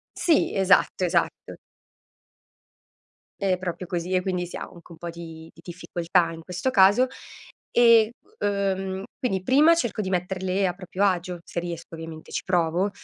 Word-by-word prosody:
Sì, 330 -3 +2
esatto, 190 -1 +3
esatto. 170 -1 -1 1.8
È 195 -2 +2
proprio 180 0 -4
così 175 +1 -3
e 185 - +3
quindi 180 -2 -2
sì - - -7
ha - - -5
anche 170 0 -13
un 165 - -11
po' 170 - -6
di 165 -1 -10
di 165 - -17
difficoltà 175 -1 -1
in 165 0 -9
questo 180 +10 -3
caso, 205 +4 +6 0.7
ehm, 230 -2 +6 0.3
uhm, 195 -1 -1 0.2
quindi 195 -8 -1
prima 295 - +5
cerco 240 -9 -1
di 190 - -3
metterle 185 +1 -1
a 180 - 0
proprio 185 +1 -4
agio, 180 -2 0
se 170 - -4
riesco 170 -1 -7
ovviamente, 160 -1 -9
ci - - -2
provo, 180 +2 +1
185 Hz, 155 wpm, -25 LUFS, 170-195 Hz, 1.8 s, caso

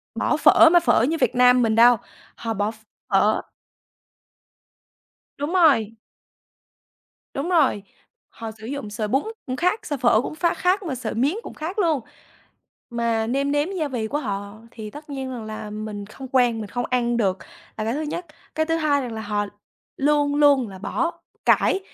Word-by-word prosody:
bỏ - - +1
phở 335 - +7
mà 350 - +7
phở 285 -8 +3
như 320 +6 +1
Việt 255 -2 +1
Nam 250 0 +6
mình 225 -2 +2
đâu, 240 +1 +7 0.4
họ 225 -1 -3
bỏ 205 +1 -1
ph - - -16 0.3
phở 205 +2 +3 2.0
Đúng 290 +4 -3
rồi. 260 - +4 1.4
Đúng 280 +6 -2
rồi, 295 - +2 0.5
họ 225 -1 -8
sử 220 - -9
dụng 270 -5 -5
sợi 215 0 -3
bún 270 +6 +2 0.2
cũng 255 0 -3
khác 365 +7 +1
sợi 290 - -2
phở 240 -2 +4
cũng 305 - -5
ph 340 +2 -1
khác 370 +3 +1
mà 320 -7 -3
sợi 240 -3 -4
miến 270 - +1
cũng - - -9
khác 330 +7 -6
luôn. 325 -7 +2 0.9
Mà 230 -1 0
nêm 275 +4 0
nếm 290 +3 +1
gia 325 -6 -2
vị 240 -5 -3
của 290 - -1
họ 200 -3 -5
thì 215 -2 -8
tất 295 +2 -11
nhiên 265 -2 -4
rằng 240 -3 -6
là 215 -1 -7
mình 210 -1 -6
không 265 +5 -10
quen 245 -3 +2
mình 210 - -6
không 245 0 -2
ăn 240 -1 +1
được 195 -5 +1 0.4
là 215 - -3
cái 225 - -1
thứ 295 +5 -2
nhất. 340 +3 -4 0.3
Cái 315 0 0
thứ 325 0 +1
hai 300 -3 +2
rằng 245 -3 -5
là 220 - -5
họ 205 -1 -2 0.5
luôn 290 0 +2
luôn 285 -5 +4
là 190 - -10
bỏ 335 - -2 0.2
cải 385 - +3
250 Hz, 190 wpm, -23 LUFS, 220-295 Hz, 2.0 s, phở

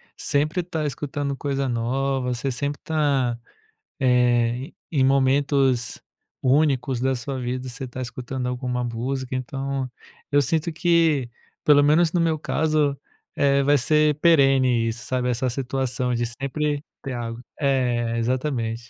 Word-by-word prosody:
sempre 155 +5 0
tá 165 -3 -3
escutando 140 0 -3
coisa 140 -1 -2
nova, 125 +2 -1
você 130 +3 -2
sempre 145 +3 -3
tá, 140 -6 +1 0.6
eh, 125 0 +2 0.2
em 135 -5 +2
momentos 135 -2 +2 0.4
únicos 135 -2 +2
da 130 +1 +1
sua 130 +2 -4
vida, 125 +1 -3
você 130 +2 -6
tá 130 +1 -7
escutando 125 +1 -5
alguma 125 0 -2
música, 125 +2 -3
então 135 +1 -3 0.4
eu 145 0 +5
sinto 160 +4 0
que, 160 -6 +2 0.3
pelo 145 -1 +6
menos 160 +3 +4
no 175 - +1
meu 160 -2 +1
caso, 150 -2 0 0.4
eh, 140 0 +3
vai 145 +1 +4
ser 150 +2 +2
perene 135 -7 +4
isso, 115 +2 -5
sabe, 125 -1 -1
essa 125 +2 0
situação 125 -1 -2
de 120 0 0
sempre 145 +4 -2 0.2
ter 135 - -5
álgo. 115 -1 -5 0.2
É, 120 -4 +1
exatamente. 120 -1 -1
135 Hz, 135 wpm, -23 LUFS, 125-145 Hz, 0.6 s, pelo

